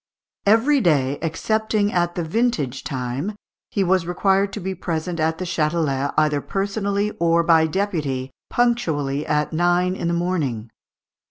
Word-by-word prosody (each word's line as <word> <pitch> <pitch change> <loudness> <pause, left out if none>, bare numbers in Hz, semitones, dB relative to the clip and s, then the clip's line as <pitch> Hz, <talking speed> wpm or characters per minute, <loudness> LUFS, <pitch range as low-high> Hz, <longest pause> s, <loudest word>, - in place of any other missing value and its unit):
Every 250 +7 +4
day, 145 - +2
excepting 215 +5 0
at 175 -1 0
the 175 - -1
vintage 160 - -1
time, 130 +9 -3 0.3
he 200 - 0
was 185 -2 +1
required 195 +2 +2
to - - -4
be 190 0 -3
present 170 -1 -3
at 160 +1 +1
the 185 - -4
Châtelet, 150 -4 0
either 150 -2 +2
personally 200 +2 -1
or 170 0 +3
by 165 -1 +4
deputy, 155 -8 -2 0.2
punctually 155 - 0
at 150 +1 0
nine 175 +2 +2
in 170 - -3
the 170 - +1
morning. 145 -11 -2
170 Hz, 145 wpm, -22 LUFS, 150-195 Hz, 0.3 s, Every